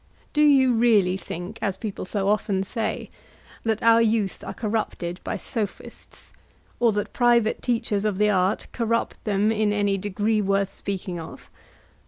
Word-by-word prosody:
Do 300 - +2
you 270 -4 +5
really 220 -6 +4
think, 180 +3 -7
as 195 -2 -1
people 210 -3 -5
so 195 0 -1
often 200 -2 +1
say, 220 +2 -3 0.5
that 220 -1 -1
our 230 0 +6
youth 220 -4 0
are - - -5
corrupted 210 -5 -3
by - - -3
Sophists, 215 -6 -6 0.5
or 235 -2 +4
that 205 0 -3
private 235 -2 +3
teachers 230 -4 0
of 210 -3 0
the 210 +1 +3
art 190 0 +1
corrupt 230 -1 -1
them 210 0 +2
in 215 -1 +1
any 205 -1 +1
degree 205 +2 0
worth 195 0 0
speaking 185 -3 -4
of? 160 - -10
210 Hz, 155 wpm, -24 LUFS, 195-230 Hz, 0.5 s, our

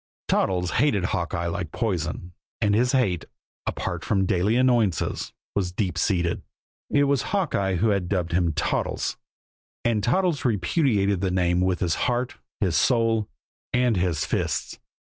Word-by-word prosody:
Toddles 90 -2 +1
hated 115 -11 +2
Hawkeye 85 -1 -1
like 85 -2 -3
poison; 90 -5 -2 0.3
and 105 -1 +2
his 125 +4 +3
hate, 100 -11 +1 0.4
apart - - -3
from 95 -2 +1
daily 95 +4 +2
annoyances, 120 -7 +1 0.2
was 95 -3 -1
deep 90 -1 -2
seated. 85 -1 0 0.5
It 145 - +3
was 140 -2 +2
Hawkeye 135 - 0
who 105 +6 +2
had 100 -4 0
dubbed 90 -4 -1
him 85 -1 +2
"Toddles." - - -1 0.7
And 110 -3 +1
Toddles 165 - +1
repudiated 100 - +1
the 95 - +1
name 90 -1 +2
with 90 -1 +1
his 85 -3 +1 0.2
heart, 125 +1 -1 0.2
his 90 -5 +1
soul 115 -3 +2 0.4
and 125 -2 +3
his 90 -4 0
fists. - - -2
100 Hz, 145 wpm, -25 LUFS, 90-120 Hz, 0.7 s, his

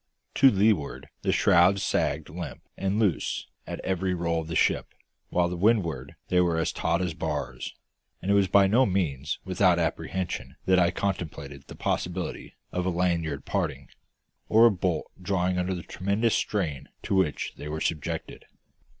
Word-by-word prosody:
To 135 - +7
leeward 95 - +1
the - - +1
shrouds 90 +3 +4
sagged 75 +2 0
limp 85 +2 -7
and 95 +1 -1
loose 105 -8 0 0.2
at - - -5
every 95 0 -1
roll 85 -1 0
of 80 - -8
the 85 - -4
ship, - - +2 0.4
while 90 0 +2
to 90 - -3
windward 85 - +1
they 90 0 +4
were 85 -2 +1
as 80 - 0
taut 90 +2 0
as 90 -3 -2
bars; - - -4 0.4
and 95 - -1
it - - +5
was 100 -1 +4
by 100 +1 +5
no 120 +7 +4
means 80 -7 -1
without 95 -1 +3
apprehension 90 +2 -2
that 95 -1 +4
I 85 -1 +4
contemplated 80 -8 -4
the - - -10
possibility 90 0 -3 0.2
of 90 0 -1
a - - +3
lanyard 85 -5 -1
parting, - - -2 0.6
or 115 +2 +7
a 120 - +7
bolt 90 -4 -1 0.2
drawing 90 -1 0
under 90 +1 -1
the 85 - -6
tremendous 100 +5 0
strain 80 -10 -1
to - - -2
which 95 -6 +1
they 75 - -7
were 75 +1 -3
subjected. 80 -2 -3
90 Hz, 165 wpm, -27 LUFS, 80-95 Hz, 0.6 s, To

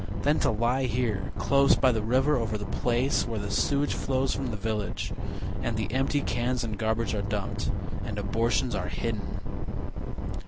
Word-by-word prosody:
Then 145 +2 +3
to - - +3
lie 120 +4 +2
here 120 -4 0
close 140 0 +5
by 130 -1 +4
the 110 -2 0
river 130 +7 +3
over 110 -3 0
the 105 - -5
place 125 +5 +1
Where 115 -2 -2
the 100 -1 -3
sewage 145 0 +2
flows 130 0 0
from 135 - -2
the 110 -3 -3
village, 105 -1 -2 0.5
And 115 -2 -1
the 110 -1 -2
empty 135 +2 +2
cans 120 0 0
and 110 -2 -2
garbage 110 +2 0
are 105 - 0
dumped, 100 -1 -2 0.3
And 105 - -4
abortions 105 0 +1
are - - -1
hidden. - - -3
115 Hz, 170 wpm, -28 LUFS, 105-130 Hz, 0.5 s, close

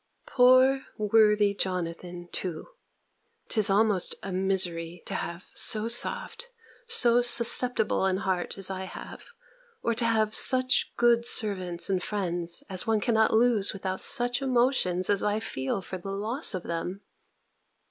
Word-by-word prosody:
Poor 260 +1 +4
worthy 210 -1 +3
Jonathan, 175 -2 -4
too, 180 - -6 0.8
('tis 215 -4 +1
almost 200 -2 +1
a 195 - -5
misery 180 -3 -1
to - - -5
have 170 +2 -5
so 215 0 +2
soft, 475 - -2 0.4
so 245 - +4
susceptible 240 -3 +3
an 190 -1 +1
heart 190 -3 -3
as 195 -1 -3
I 190 0 -5
have, - - -10 0.6
or 235 - 0
to 230 +1 0
have 220 -2 +1
such 255 +1 +2
good 235 -1 +3
servants 185 -5 0
and 190 -2 -1
friends 175 -4 -3
as 185 +1 -3
one 220 -1 +2
cannot 220 0 +1
lose 225 -3 +2
without 190 -1 -5
such 245 0 0
emotions 240 -9 0
as 200 -1 +1
I 210 +1 0
feel 185 -3 -4
for 185 +1 -7
the 195 - -8
loss 215 +6 -2
of 180 - -5
them!) 175 +4 -5
205 Hz, 140 wpm, -27 LUFS, 185-235 Hz, 0.8 s, Poor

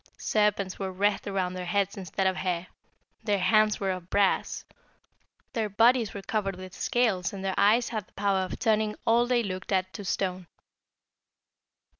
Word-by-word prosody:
Serpents 210 -3 0
were 190 -1 -3
wreathed 200 +2 0
around 190 -2 -1
their 180 -1 -5
heads 200 +1 0
instead 190 0 -3
of 190 0 +2
hair, 180 -2 -2 0.6
their 205 -2 +1
hands 215 +2 +3
were 195 -1 0
of 185 -1 -6
brass, 200 -1 +1 0.9
their 220 -3 -1
bodies 230 +2 +3
were 200 - -7
covered 195 -3 -1
with 185 0 -10
scales, 205 -7 0
and 195 -1 -6
their 190 - 0
eyes 230 +4 +4
had 215 -4 -4
the - - -30
power 200 -1 +1
of 185 -1 -3
turning 215 -2 +1
all 235 +1 +4
they 245 -1 +2
looked 185 -2 -5
at 185 -1 0
to 205 - -7
stone. 185 -2 -2
200 Hz, 170 wpm, -28 LUFS, 185-215 Hz, 0.9 s, eyes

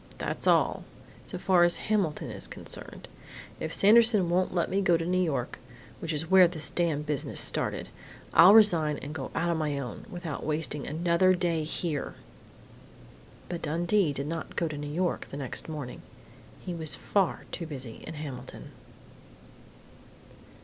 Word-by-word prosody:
That's - - -4
all - - +3 0.4
so - - -5
far 185 -3 +3
as 175 0 +4
Hamilton 195 -8 -1
is - - -6
concerned! - - -6 0.5
If 160 - -4
Sanderson 210 -3 +5
won't 185 +1 +1
let 175 -2 0
me 195 +1 0
go 175 -3 +3
to 165 - -4
New 185 +1 +1
York 140 -8 -2 0.4
which 165 - -4
is 155 0 -1
where 185 0 +7
this 165 -3 0
damned 160 -4 0
business 150 -2 -2
started - - +2 0.5
I'll 185 +5 +8
resign 165 -9 +5
and 145 - -7
go 140 -4 -5
on 170 0 0
my 150 -2 -1
own, 130 - -7
without 175 -6 -6
wasting 150 -2 -2
another 170 +4 +2
day 170 -3 0
here!" 155 -2 -3 1.3
But 175 -1 -5
Dundee 170 +3 +1
did 140 0 -4
not 165 +1 -5
go 170 - 0
to 155 - -5
New 145 0 -5
York 175 +3 -1
the 140 - -7
next 140 +2 -4
morning. 145 -5 -6 0.6
He 180 - -4
was 160 -3 -3
far 195 -4 0
too 170 - -5
busy 130 -7 -6
in - - -9
Hamilton.... 145 -4 -8
165 Hz, 155 wpm, -28 LUFS, 150-180 Hz, 1.3 s, I'll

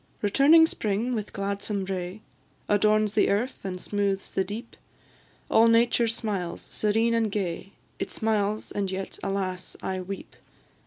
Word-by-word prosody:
Returning 285 +10 +6
spring, 225 -3 -1
with 215 -3 -3
gladsome 200 0 -2
ray, 185 +1 -4 0.5
Adorns 210 0 +3
the 215 - +3
earth 225 +6 -1
and 185 -1 -4
smoothes 200 0 -1
the 190 - +1
deep: 215 +5 -7 0.7
All 225 +1 +5
nature 235 +1 +4
smiles, 210 -6 -3
serene 225 +2 +1
and 225 -2 +1
gay, 195 -1 -3 0.3
It - - -2
smiles, 215 -1 -1
and 200 -2 -1
yet, 190 0 -5
alas! 185 -2 -3
I 190 -1 -2
weep. 195 +2 -7
205 Hz, 140 wpm, -27 LUFS, 195-225 Hz, 0.7 s, Returning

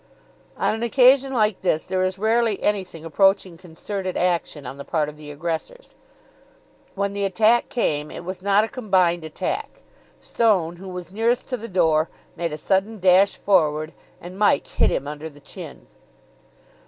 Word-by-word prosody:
On - - +1
an 220 - -4
occasion 260 +3 +4
like 215 -5 +1
this 160 -4 0
there 185 0 -1
is 185 +1 -1
rarely 220 0 +1
anything 185 -6 -2
approaching 190 +2 +2
concerted 185 +3 -5
action 170 -5 -1
on 130 +2 -7
the 140 - -7
part 155 -2 -1
of 150 - -11
the 150 -1 -11
aggressors. 165 - -5 1.0
When 200 0 -1
the 200 0 -2
attack 220 +5 +3
came, 150 - -1
it 170 - -9
was 185 0 -6
not 200 +2 +3
a - - -1
combined 185 -9 +1
attack; 160 - -4 0.4
Stone, 185 -7 +1
who 190 +1 -9
was 180 -1 -7
nearest 230 +4 0
to 250 - -2
the 230 0 -8
door, 160 -5 +2 0.3
made 170 -2 -3
a 150 - -4
sudden 195 +7 0
dash 185 +2 +5
forward, 155 -5 +1 0.3
and 180 +3 -10
Mike 205 -9 +3
hit - - +1
him 140 - -2
under 150 +2 -6
the 145 -1 -17
chin. 145 - -10
185 Hz, 165 wpm, -23 LUFS, 160-210 Hz, 1.0 s, dash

